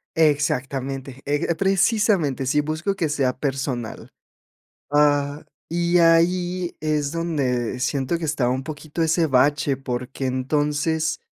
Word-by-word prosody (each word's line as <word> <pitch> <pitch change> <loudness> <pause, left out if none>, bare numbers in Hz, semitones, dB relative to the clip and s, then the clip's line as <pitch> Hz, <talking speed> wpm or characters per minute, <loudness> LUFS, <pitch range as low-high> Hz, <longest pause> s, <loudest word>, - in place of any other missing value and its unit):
Exactamente, 135 -3 0
eh, 145 +1 0
g 170 0 -1
precisamente, 195 - +2
sí, 150 +3 +2
busco 155 +6 -2
que 165 -5 -1
sea 135 -4 +1
personal. 135 -4 -4 0.8
Ah, 145 0 +2 0.2
y 170 +1 +1
ahí 175 +2 +2
es 150 -2 0
donde 135 -8 -1
siento 135 +4 0
que 165 - -5
está 145 -5 0
un 130 +1 -1
poquito 155 +2 -5
ese 160 +1 +2
bache, 140 +1 +2
porque 130 0 -4
entonces 150 +4 0
145 Hz, 120 wpm, -23 LUFS, 135-165 Hz, 0.8 s, precisamente